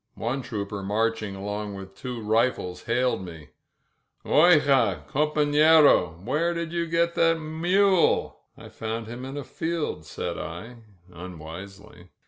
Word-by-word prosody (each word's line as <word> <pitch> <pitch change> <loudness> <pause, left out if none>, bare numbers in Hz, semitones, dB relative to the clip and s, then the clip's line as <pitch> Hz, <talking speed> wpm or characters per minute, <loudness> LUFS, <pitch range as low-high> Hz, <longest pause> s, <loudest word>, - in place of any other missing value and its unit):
One 125 +4 -2
trooper 105 -5 -5
marching 110 0 -1
along 105 +1 -5
with 95 0 -9
two 120 +2 -7
rifles 110 -5 0
hailed 125 -3 0
me. 80 -4 -10 0.8
Oijaj 150 -4 +4
compaflerOf 150 - +4
where 160 +9 0
did 170 0 -4
you 170 -1 -1
get 170 +1 +1
that 165 -1 +3
mule?*' 175 +4 +2 0.2
"I - - -12
found 110 +1 -5
him 120 +3 -8
in 135 +2 -7
a 145 - -4
field,'' 160 - -4
said - - -5
I 90 +10 -7 0.4
unwisely. 90 +2 -10
120 Hz, 125 wpm, -25 LUFS, 100-155 Hz, 0.8 s, Oijaj